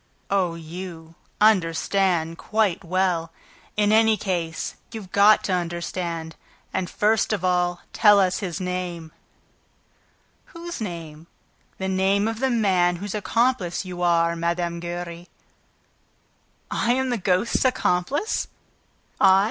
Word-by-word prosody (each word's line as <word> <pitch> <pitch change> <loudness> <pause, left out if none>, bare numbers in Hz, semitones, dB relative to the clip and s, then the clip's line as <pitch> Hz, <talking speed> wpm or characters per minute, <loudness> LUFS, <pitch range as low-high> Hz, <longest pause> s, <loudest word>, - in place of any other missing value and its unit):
"Oh, 185 -4 +1
you, 165 0 -8 0.3
understand 180 -3 +2
quite 210 -4 0
well. 175 -2 0 0.5
In 210 0 +3
any 220 0 +5
case, 175 -5 -3 0.2
you've 215 -5 -8
got 205 +2 +5
to 190 - -1
understand... 170 -1 -3 0.4
And, 185 -1 -2
first 215 +2 +1
of 200 -4 -1
all, 175 -1 +1
tell 205 -1 +6
us 185 -1 +2
his 185 -3 -4
name." 180 -3 -4 1.3
"Whose 340 -4 -8
name?" 165 -5 -7 0.5
"The 190 - -3
name 190 +2 +2
of 225 0 -3
the 265 +1 +1
man 190 -7 +2
whose 200 +3 -6
accomplice 215 -3 0
you 180 -1 -6
are, 170 -1 +3
Mme. 170 0 -2
Giry!" 175 0 -6 1.4
"I 235 - +1
am 260 0 0
the 240 - -1
ghost's 185 +4 +1
accomplice? 255 - 0 0.7
I?... 190 -1 +6
185 Hz, 120 wpm, -24 LUFS, 170-210 Hz, 1.4 s, tell